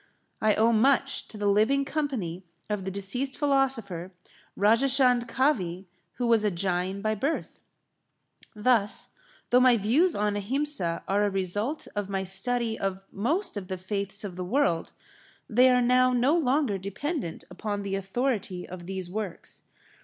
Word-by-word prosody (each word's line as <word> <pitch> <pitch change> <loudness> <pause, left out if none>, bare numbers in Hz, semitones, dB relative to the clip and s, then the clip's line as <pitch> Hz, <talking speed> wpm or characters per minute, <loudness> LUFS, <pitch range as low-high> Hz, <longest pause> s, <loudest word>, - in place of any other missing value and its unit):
I 215 -1 +3
owe 225 +2 +3
much 275 +4 +2
to 215 - -10
the 205 - -3
living 220 +8 +3
company 255 - -3 0.3
of 200 -3 -2
the - - -2
deceased 200 +8 -1
philosopher, 245 - 0 0.5
Rajachand 245 +3 +3
Kavi, 220 - 0 0.3
who 245 - -3
was 230 -2 +3
a 210 - +3
Jain 185 +1 -1
by 215 0 +1
birth. 275 +10 -3 1.0
Thus, 210 -1 +1 0.4
though 250 - +6
my 250 -2 +5
views 270 - +2
on 210 0 0
Ahimsa 205 - +1
are 200 +2 +2
a - - +1
result 205 - -1
of 205 -1 -3
my 195 -1 -1
study 220 +4 0
of 195 0 -3
most 295 - -1
of 190 -2 -6
the 185 0 -4
faiths 200 +2 -2
of 185 -3 -6
the 180 - -3
world, 180 - 0 0.6
they 250 +3 +5
are 250 -1 +3
now 255 +1 +4
no 250 +6 +3
longer 270 - +1
dependent 200 - -4
upon 205 +2 -4
the 195 -1 -4
authority 195 -2 -2
of 175 -1 -9
these 190 -2 -4
works. 200 -1 -6
210 Hz, 155 wpm, -27 LUFS, 195-255 Hz, 1.0 s, though